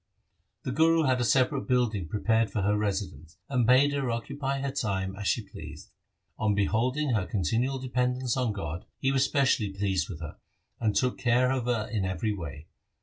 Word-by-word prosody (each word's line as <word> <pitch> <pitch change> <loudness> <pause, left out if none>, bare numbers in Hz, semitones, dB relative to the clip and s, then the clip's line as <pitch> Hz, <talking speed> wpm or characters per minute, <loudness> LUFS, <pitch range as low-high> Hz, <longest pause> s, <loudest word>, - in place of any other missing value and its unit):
The 130 - -3
Guru 165 +3 +4
had 130 -3 +2
a - - +2
separate 130 +4 +2
building 120 - +1
prepared 110 +4 +1
for 105 - -2
her 105 +1 +2
residence, 95 -6 -3
and 125 -4 +1
bade 135 +3 +5
her 140 -3 -1
occupy 135 +4 -2
her 140 0 -2
time 95 -7 -2
as 100 0 -4
she 115 - +1
pleased. 80 -4 -10 0.5
On 105 -2 +2
beholding 125 +8 +1
her 110 -6 0
continual 115 - 0
dependence 125 -1 -1
on 125 -4 0
God, 85 -4 -5
he 135 - +1
was 135 -1 +3
specially 130 -8 +2
pleased 95 -3 -1
with 85 -6 -6
her, 80 -3 -8 0.4
and 110 -3 0
took 125 -1 +1
care 125 +1 +3
of 130 -3 -1
her 115 -3 0
in 105 -4 -2
every 95 +3 -1
way. 80 -6 -7
115 Hz, 185 wpm, -28 LUFS, 100-130 Hz, 0.5 s, bade